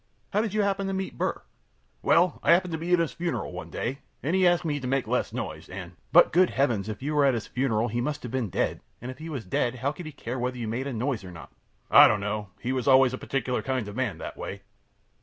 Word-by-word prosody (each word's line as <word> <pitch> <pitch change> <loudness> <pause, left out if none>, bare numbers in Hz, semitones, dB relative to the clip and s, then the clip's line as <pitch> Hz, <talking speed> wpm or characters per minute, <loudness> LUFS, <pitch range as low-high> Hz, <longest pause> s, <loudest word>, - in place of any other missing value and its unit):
How 210 - +3
did 215 -2 -3
you 210 - +3
happen 195 -1 0
to 195 - -2
meet 190 0 -3
Burr? - - +2
A. - - -17 0.6
Well, 175 +2 +3
I 165 - +5
happened 180 0 +2
to 160 - -1
be 170 +2 -3
at 180 - +6
his 165 -3 0
funeral 170 -1 -3
one - - -7
day, 130 +4 -3 0.2
and 155 +7 +1
he 185 -1 +5
asked 175 0 +2
me 145 -2 0
to 130 - -5
make 135 0 +1
less - - 0
noise, - - -5
and 90 -2 -7
Q. 85 - -26
But, - - +7
good 180 +2 +5
heavens! 120 -7 0
if 110 +4 -6
you 150 +2 -1
were 145 -1 +4
at 135 -3 +4
his 115 - -3
funeral, 120 -3 0
he 120 +2 -2
must 145 +4 -3
have 120 - -6
been 125 -5 -1
dead, - - -1 0.2
and 125 +2 -6
if 130 - -12
he 160 +1 -7
was 135 -8 -5
dead 120 +7 0
how 130 +3 -1
could 155 +2 -8
he - - -6
care 130 -3 -5
whether 125 +1 -2
you 115 -2 -4
made 120 +5 -2
a 140 - -3
noise 120 -1 -2
or 90 - -9
not? 85 - -11 0.4
A. - - +6
I - - +11
don't 105 - +2
know. 105 0 -3
He 125 - -2
was 130 -1 -2
always 130 -1 +6
a 130 - -4
particular 130 -2 -1
kind 130 -5 -2
of 105 - -7
a - - -9
man 125 -6 -1
that - - -7
way. - - -6
130 Hz, 290 wpm, -27 LUFS, 120-160 Hz, 0.6 s, I